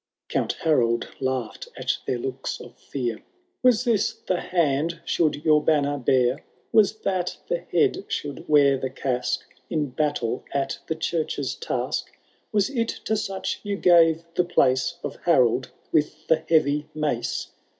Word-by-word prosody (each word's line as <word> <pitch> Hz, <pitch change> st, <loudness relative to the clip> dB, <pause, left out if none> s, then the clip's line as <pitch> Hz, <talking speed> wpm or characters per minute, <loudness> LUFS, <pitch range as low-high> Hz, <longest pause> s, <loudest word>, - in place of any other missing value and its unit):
VI. -, -, +3 dB
Coimt -, -, -1 dB
Harold 120 Hz, -7 st, +1 dB
laughed 130 Hz, -4 st, -3 dB
at -, -, -1 dB
their 125 Hz, -, 0 dB
looks 130 Hz, +2 st, -4 dB
of -, -, -12 dB
fear; 120 Hz, -5 st, -4 dB
•( -, -, -22 dB, 0.4 s
Was 250 Hz, -2 st, +4 dB
this 230 Hz, -5 st, +2 dB
the 185 Hz, -1 st, -2 dB
hand 165 Hz, -1 st, 0 dB
should 155 Hz, -3 st, 0 dB
your 150 Hz, -1 st, +5 dB
banner 145 Hz, -2 st, +2 dB
bear? 130 Hz, +1 st, +2 dB, 0.3 s
Was 215 Hz, 0 st, +4 dB
that 180 Hz, -1 st, -1 dB
the -, -, 0 dB
head 390 Hz, -2 st, +2 dB
should 145 Hz, -1 st, -5 dB
wear 140 Hz, -3 st, +5 dB
the 130 Hz, -, -2 dB
casque 125 Hz, -2 st, -1 dB, 0.3 s
In 150 Hz, -5 st, -1 dB
battle 130 Hz, -4 st, -1 dB
at 135 Hz, -1 st, -1 dB
the 160 Hz, -, -1 dB
churches 160 Hz, -5 st, -2 dB
task? -, -, -3 dB, 0.4 s
Was 205 Hz, -2 st, +2 dB
it 230 Hz, -4 st, 0 dB, 0.2 s
to 220 Hz, -, +1 dB
such 195 Hz, -2 st, -3 dB
you 205 Hz, -1 st, -3 dB
gave 165 Hz, -3 st, +5 dB
the 180 Hz, -, +2 dB
place 170 Hz, -1 st, +2 dB
Of -, -, -5 dB
Harold 125 Hz, -6 st, +3 dB, 0.2 s
with 150 Hz, 0 st, 0 dB
the 160 Hz, -, +3 dB
heavy 150 Hz, -2 st, +3 dB
mace 145 Hz, -6 st, -1 dB
150 Hz, 155 wpm, -25 LUFS, 130-175 Hz, 0.4 s, your